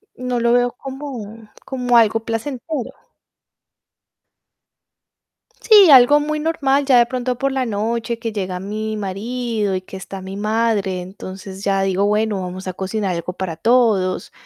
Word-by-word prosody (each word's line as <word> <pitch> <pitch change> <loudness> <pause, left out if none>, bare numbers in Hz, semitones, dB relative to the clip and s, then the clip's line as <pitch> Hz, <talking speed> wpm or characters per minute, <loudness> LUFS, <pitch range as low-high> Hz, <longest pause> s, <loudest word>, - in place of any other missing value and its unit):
No 250 -1 -2
lo 235 0 +2
veo 245 0 +3
como 245 -6 -8 0.2
como 250 -2 +1
algo 225 0 +4
placentero. 245 +4 -4 2.7
Sí, 415 -5 +7
algo 270 +2 +7
muy 305 +1 -2
normal. 285 -3 +1
Ya 260 -3 +5
de 240 - +5
pronto 250 0 -3
por 275 +2 0
la 265 -1 -1
noche 230 +2 -2
que 230 -1 -4
llega 185 -3 -4
mi 215 +3 -4
marido, 215 +1 -2
y 185 - -2
que 190 +1 -10
está 190 +1 -8
mi 190 +1 -7
madre, 210 -3 0
entonces 190 +1 -9
ya 195 -1 +1
digo: 195 +1 +1
"Bueno, 210 -1 0
vamos 185 +1 -6
a 185 - -3
cocinar 190 0 -2
algo 170 +2 -4
para 180 -3 -4
todos". 220 -6 +2
225 Hz, 150 wpm, -20 LUFS, 195-250 Hz, 2.7 s, Sí